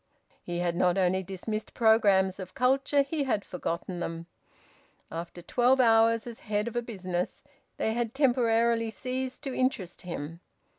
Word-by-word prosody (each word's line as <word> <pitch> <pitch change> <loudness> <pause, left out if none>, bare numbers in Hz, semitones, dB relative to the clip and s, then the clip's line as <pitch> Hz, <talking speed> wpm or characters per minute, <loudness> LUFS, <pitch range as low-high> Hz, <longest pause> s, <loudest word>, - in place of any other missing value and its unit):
He 175 0 -4
had 175 -1 0
not 180 +1 +2
only 190 0 +2
dismissed 195 +4 -5
programmes 200 -4 +4
of 185 -1 -8
culture, 270 +2 +3
he 280 +1 -2
had 215 -6 0
forgotten 175 0 -4
them. 165 -1 -4 0.9
After 170 +1 -6
twelve 250 +7 +3
hours 225 -1 +4
as 235 -2 -8
head 210 +1 -1
of 235 - -5
a 240 - +1
business, 185 -6 -4 0.3
they 220 - 0
had 235 +1 -2
temporarily 235 -4 +3
ceased 255 +4 -4
to 270 -3 -3
interest 255 -10 -1
him. 165 -2 -6
220 Hz, 150 wpm, -28 LUFS, 180-245 Hz, 0.9 s, programmes